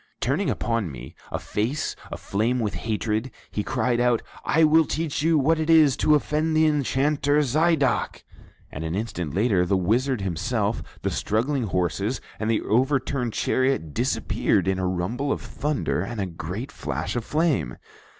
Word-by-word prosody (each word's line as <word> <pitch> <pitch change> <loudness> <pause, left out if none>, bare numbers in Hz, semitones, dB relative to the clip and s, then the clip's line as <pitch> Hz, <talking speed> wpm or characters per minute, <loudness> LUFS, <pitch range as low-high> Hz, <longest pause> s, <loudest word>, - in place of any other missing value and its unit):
Turning - - 0
upon 115 -7 -1
me 65 0 -9 0.2
a - - -1
face 120 +9 -2 0.2
aflame 115 +5 -1
with 105 -3 -1
hatred, 110 +2 -2 0.2
he 105 - -1
cried 125 +1 0
out, 120 -2 +2 0.2
'I 160 +2 +3
will 160 +1 +5
teach 155 -2 -2
you 160 +1 +3
what 155 +3 +2
it 160 0 -1
is 155 -5 +6
to 150 - +4
offend 155 +2 0
the 160 - +5
Enchanter 145 0 +1
Zidoc'; 150 0 +1 0.5
and 80 - -6
an 80 +2 -3
instant 90 -8 -3
later 100 -3 +3
the 95 +2 +1
wizard 120 +6 +1
himself, 100 +4 -1 0.2
the - - 0
struggling 125 +4 0
horses, 95 +5 -1 0.2
and 110 - -1
the 115 - +2
overturned 130 0 +1
chariot 130 - 0
disappeared - - 0
in 95 0 +1
a 95 - 0
rumble 95 +11 -1
of - - 0
thunder 150 0 -2
and 120 -2 -5
a 100 - 0
great 90 +7 -6
flash 80 +9 -4
of 120 - -1
flame. 150 - 0
120 Hz, 160 wpm, -24 LUFS, 100-145 Hz, 0.5 s, is